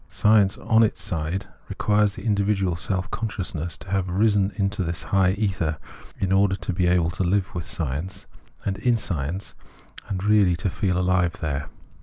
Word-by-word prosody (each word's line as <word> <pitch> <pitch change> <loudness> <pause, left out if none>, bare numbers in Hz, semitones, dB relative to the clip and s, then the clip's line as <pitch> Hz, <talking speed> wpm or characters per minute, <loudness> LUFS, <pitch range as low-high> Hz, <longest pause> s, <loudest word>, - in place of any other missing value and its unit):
Science 105 -2 +3
on 115 0 +3
its 110 - +2
side 85 +3 -2 0.2
requires 105 -1 +2
the - - -9
individual 100 -4 +1
self 95 +2 -3
conscious 105 -4 -3
ness 85 +1 -3
to 95 - -10
have 95 -2 0
risen 100 +1 +2
into 100 0 -1
this 85 -1 -3
high 95 -1 +2
ether, 95 -7 -1 0.4
in 95 - -1
order 95 0 +3
to 95 0 -4
be 90 0 +1
able 90 -1 +2
to 95 - -5
Hve 95 +2 0
with 85 -3 -4
science, 85 +6 -3 0.4
and 95 0 -2
in 120 -2 +2
science, 90 -1 -3 0.5
and 95 -2 -3
really 105 -4 +4
to 90 +2 -2
feel 95 -1 0
ahve 90 -1 +2
there. 70 -2 -3
95 Hz, 175 wpm, -24 LUFS, 90-100 Hz, 0.5 s, really